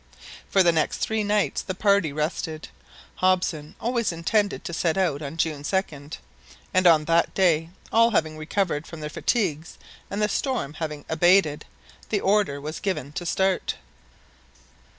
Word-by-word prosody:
For 195 - +4
the 175 - +5
next 160 -2 0
three 220 -1 -1
nights 205 0 +1
the 185 - -5
party 200 -5 +2
rested. 155 +1 -3 0.5
Hobson 180 -5 0
always 235 -3 0
intended 200 +5 0
to 170 - -5
set 165 +1 0
out 165 -7 +1
on 150 +2 -6
June 155 -3 -1
2d; 150 -4 -3 0.6
and 185 -1 +4
on 155 -3 +5
that 170 +1 +2
day, 165 -4 +2 0.2
all 230 +1 +5
having 160 -8 0
recovered 155 0 -2
from 165 -2 -9
their 150 0 -5
fatigues 170 -9 -1 0.3
and 200 - -4
the 210 - +2
storm 235 - -2
having 150 -2 -5
abated, 170 -2 +3 0.4
the 210 - +1
order 195 -8 +1
was 155 +3 -6
given 185 -9 -3
to 175 +3 -5
start. 190 +1 0
170 Hz, 150 wpm, -25 LUFS, 155-195 Hz, 0.6 s, the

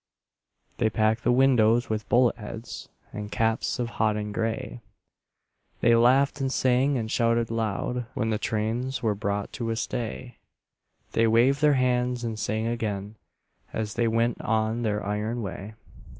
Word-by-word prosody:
They 110 - +3
packed 110 +1 +1
the - - +3
windows 120 -3 +4
with 110 -1 -3
bullet 120 -1 +4
heads 110 +1 -8 0.2
And 105 0 -6
caps 115 0 0
of 120 -1 -2
hodden 105 -1 0
gray; 115 +3 -3 1.0
They 120 - +5
laughed 135 +5 +3
and 135 -1 0
sang 130 +2 +2
and 110 -2 -3
shouted 115 -1 +1
loud 115 +2 -2
When 110 +1 0
the 105 - 0
trains 115 +5 -2
were 110 -2 +2
brought 100 0 -3
to 115 -3 -3
a 115 - 0
stay; 120 +1 -4 0.7
They 115 0 +3
waved 125 +6 +3
their 150 -1 +5
hands 125 -1 +1
and 110 -2 -3
sang 110 +1 -1
again 105 -3 -3 0.6
As 110 -1 -3
they 115 0 +1
went 115 +1 0
on 110 +1 0
their 105 -2 -1
iron 105 +3 -2
way. 100 +2 -7
115 Hz, 150 wpm, -26 LUFS, 110-125 Hz, 1.0 s, They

